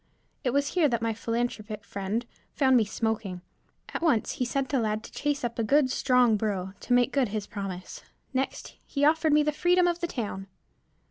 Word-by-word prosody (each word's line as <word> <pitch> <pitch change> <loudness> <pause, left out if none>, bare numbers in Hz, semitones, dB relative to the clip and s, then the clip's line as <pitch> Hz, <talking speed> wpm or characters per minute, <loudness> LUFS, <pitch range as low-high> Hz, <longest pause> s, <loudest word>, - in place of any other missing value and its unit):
It 255 - +1
was 280 +3 +1
here 345 -5 +3
that 235 -2 -1
my 225 -1 +1
philanthropic 230 -2 -3
friend 200 +4 -3 0.3
found 265 -2 +4
me 230 -3 +5
smoking. 210 -4 -2 0.5
At - - -3
once, 295 -11 +2
he 250 - -2
sent 275 +3 -2
a 270 - +3
lad 215 -1 -1
to - - -11
chase 290 -1 -1
up 235 -1 -3
a - - +2
good, 270 +3 +3
strong 250 -4 +3
burro 195 -3 -2
to 245 - -1
make 245 +2 +3
good 275 -3 +2
his 210 0 -3
promise; 195 -4 -6 0.3
next 265 +1 -3
he 280 0 +1
offered 315 +1 +3
me 300 0 +5
the 300 - +1
freedom 355 +4 +3
of 345 0 0
the 345 - -1
town. 205 - -4
240 Hz, 200 wpm, -28 LUFS, 215-280 Hz, 0.5 s, me